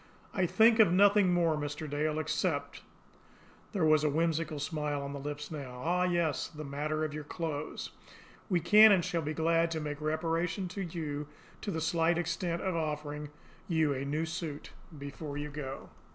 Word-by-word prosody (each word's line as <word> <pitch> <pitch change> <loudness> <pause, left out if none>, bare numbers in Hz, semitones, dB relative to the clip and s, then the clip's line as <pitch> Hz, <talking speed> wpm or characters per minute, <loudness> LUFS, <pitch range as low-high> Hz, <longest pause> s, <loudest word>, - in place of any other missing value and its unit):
I 185 -3 +1
think 225 +4 +5
of 210 -6 +7
nothing 200 0 +5
more, 170 -3 +3
Mr. 145 +1 -4
Dale, 150 +1 -1
except 155 0 -1 0.4
" - - -27
There 190 -7 +1
was 155 -1 +5
a 150 - +3
whimsical 160 0 0
smile 150 -1 -2
on 140 0 -5
the 140 - -5
lips 145 +2 -5
now. 135 -5 -6
"Ah, 180 +2 +2
yes, 170 -5 0
the 155 -1 -8
matter 150 +2 -2
of 150 - -5
your 150 0 -5
clothes. 155 -1 -4 0.6
We 180 -3 +2
can, 210 +6 +8
and 185 -4 +4
shall 170 - -1
be 155 0 -3
glad 165 +1 +2
to 165 -1 -2
make 150 -1 -5
reparation 165 +4 -1
to 195 +2 -5
you 155 -5 -4 0.3
to - - -4
the 160 -4 -2
slight 165 +1 +2
extent 175 0 -2
of 185 -2 -1
offering 150 -2 -3 0.4
you 160 -4 +2
a 135 0 -3
new 150 +3 -1
suit 160 -2 -5 0.3
before 140 +1 -6
you 150 0 -4
go." 140 -2 -6
155 Hz, 180 wpm, -31 LUFS, 150-170 Hz, 0.6 s, can